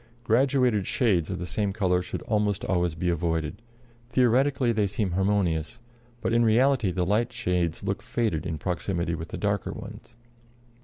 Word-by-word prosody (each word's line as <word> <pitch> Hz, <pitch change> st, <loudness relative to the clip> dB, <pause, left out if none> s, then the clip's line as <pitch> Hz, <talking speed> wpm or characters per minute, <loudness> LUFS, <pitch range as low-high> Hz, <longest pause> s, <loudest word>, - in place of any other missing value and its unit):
Graduated 125 Hz, -3 st, +2 dB
shades 95 Hz, -, +1 dB
of 95 Hz, -, -3 dB
the 90 Hz, -, -4 dB
same 100 Hz, +2 st, -1 dB
color 90 Hz, -3 st, +1 dB
should 90 Hz, -, -6 dB
almost 105 Hz, -2 st, 0 dB
always 90 Hz, -3 st, 0 dB
be 90 Hz, +2 st, -2 dB
avoided; 85 Hz, +2 st, -1 dB, 0.5 s
theoretically 130 Hz, +1 st, +3 dB
they 105 Hz, -3 st, +1 dB
seem 100 Hz, -1 st, -2 dB
harmonious, 95 Hz, 0 st, 0 dB, 0.4 s
but -, -, -1 dB
in 120 Hz, 0 st, +4 dB
reality 120 Hz, 0 st, +3 dB
the 90 Hz, 0 st, -1 dB
light 110 Hz, +6 st, +1 dB
shades 90 Hz, -9 st, -1 dB
look 100 Hz, +1 st, -2 dB
faded 105 Hz, -8 st, -1 dB
in 80 Hz, -, -3 dB
proximity 85 Hz, +1 st, -2 dB
with 80 Hz, 0 st, -5 dB
the -, -, -6 dB
darker 100 Hz, -1 st, -1 dB
ones. 115 Hz, -, -10 dB
100 Hz, 160 wpm, -26 LUFS, 90-115 Hz, 0.5 s, in